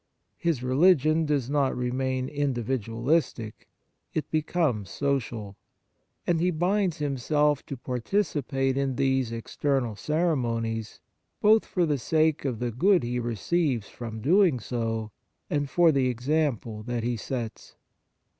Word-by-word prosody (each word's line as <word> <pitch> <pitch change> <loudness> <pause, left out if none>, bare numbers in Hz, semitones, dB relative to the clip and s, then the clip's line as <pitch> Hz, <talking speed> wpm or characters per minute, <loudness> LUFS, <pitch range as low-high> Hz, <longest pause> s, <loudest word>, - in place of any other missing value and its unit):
His 165 -8 0
religion 155 +3 +4
does 140 -5 0
not 140 -2 +1
re 125 0 -1
main 130 0 -1
individualistic, 125 -2 -1 0.5
it 155 - -2
becomes 155 - 0
social. 120 -8 -2 0.7
And 170 -2 +2
he 180 +2 +2
binds 180 +1 +1
himself 145 0 +1
to 140 - -5
par 125 0 -4
ticipate 135 - 0
in 135 -2 0
these 130 -2 +1
external 120 0 -1
ceremonies, 115 - -1 0.4
both 215 +1 +5
for 180 -2 +1
the 145 -3 0
sake 155 +3 +1
of 125 -4 -1
the 120 +1 -2
good 180 - +3
he 120 +1 -1
receives 120 - -1
from 110 -2 -7
doing 170 - +4
so 115 -2 -3 0.4
and 145 -1 0
for 170 +1 +5
the 135 -3 +2
example 125 -3 -1
that 120 +1 -3
he 120 +1 0
sets. 115 0 -5
135 Hz, 130 wpm, -27 LUFS, 120-155 Hz, 0.7 s, both